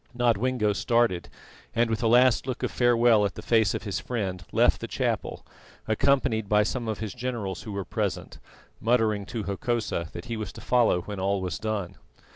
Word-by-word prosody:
Nodwengo 120 Hz, -2 st, +2 dB
started, 115 Hz, -4 st, +1 dB, 0.5 s
and, 120 Hz, +1 st, +3 dB
with 115 Hz, 0 st, -2 dB
a 115 Hz, -, +2 dB
last 125 Hz, +2 st, +4 dB
look 130 Hz, -2 st, -4 dB
of -, -, -1 dB
farewell 120 Hz, -3 st, +4 dB
at 100 Hz, -3 st, -1 dB
the -, -, -8 dB
face 110 Hz, -5 st, +3 dB
of -, -, -4 dB
his 100 Hz, -3 st, -3 dB
friend, 95 Hz, -7 st, -3 dB
left -, -, +3 dB
the -, -, -4 dB
chapel, -, -, -2 dB, 0.4 s
accompanied 110 Hz, -2 st, +1 dB
by 105 Hz, 0 st, +4 dB
some 120 Hz, +2 st, -3 dB
of 110 Hz, -2 st, -2 dB
his 110 Hz, -2 st, -5 dB
generals 120 Hz, -7 st, -4 dB
who 110 Hz, -, -7 dB
were 100 Hz, -1 st, -4 dB
present, -, -, -3 dB, 0.4 s
muttering 110 Hz, -4 st, +1 dB
to 115 Hz, -3 st, -4 dB
Hokosa 100 Hz, -4 st, -2 dB
that 85 Hz, -, -7 dB
he 115 Hz, -1 st, -4 dB
was 110 Hz, -, -5 dB
to -, -, -11 dB
follow 120 Hz, -7 st, +3 dB
when 100 Hz, +2 st, -7 dB
all 100 Hz, +1 st, 0 dB
was 90 Hz, -3 st, -3 dB
done. 105 Hz, -5 st, -3 dB
110 Hz, 190 wpm, -26 LUFS, 100-120 Hz, 0.5 s, last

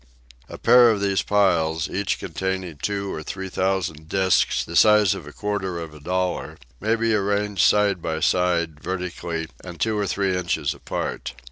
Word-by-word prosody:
A -, -, -8 dB
pair 125 Hz, -1 st, +6 dB
of 110 Hz, -3 st, +1 dB
these 100 Hz, -1 st, +1 dB
piles, 80 Hz, -6 st, +2 dB
each 100 Hz, 0 st, -1 dB
containing 95 Hz, -4 st, -4 dB
two 100 Hz, -1 st, -2 dB
or 75 Hz, -, -5 dB
three 95 Hz, +4 st, -6 dB
thousand 90 Hz, -5 st, -2 dB
disks 95 Hz, -1 st, +2 dB
the 85 Hz, -, -7 dB
size 105 Hz, -1 st, +6 dB
of 75 Hz, -, -8 dB
a -, -, -8 dB
quarter 95 Hz, -1 st, -3 dB
of 80 Hz, -2 st, -7 dB
a 75 Hz, -, -12 dB
dollar, 90 Hz, +4 st, -2 dB, 0.2 s
may 110 Hz, +2 st, +1 dB
be 115 Hz, 0 st, +1 dB
arranged 100 Hz, -1 st, 0 dB
side 105 Hz, -4 st, +3 dB
by 80 Hz, -1 st, -2 dB
side, 85 Hz, -3 st, +1 dB
vertically, 85 Hz, -3 st, -4 dB, 0.2 s
and 85 Hz, -3 st, -9 dB
two 110 Hz, +4 st, +1 dB
or 105 Hz, -1 st, -1 dB
three 95 Hz, +1 st, 0 dB
inches 85 Hz, -5 st, -1 dB
apart. 65 Hz, -, -5 dB
95 Hz, 170 wpm, -23 LUFS, 85-100 Hz, 0.2 s, pair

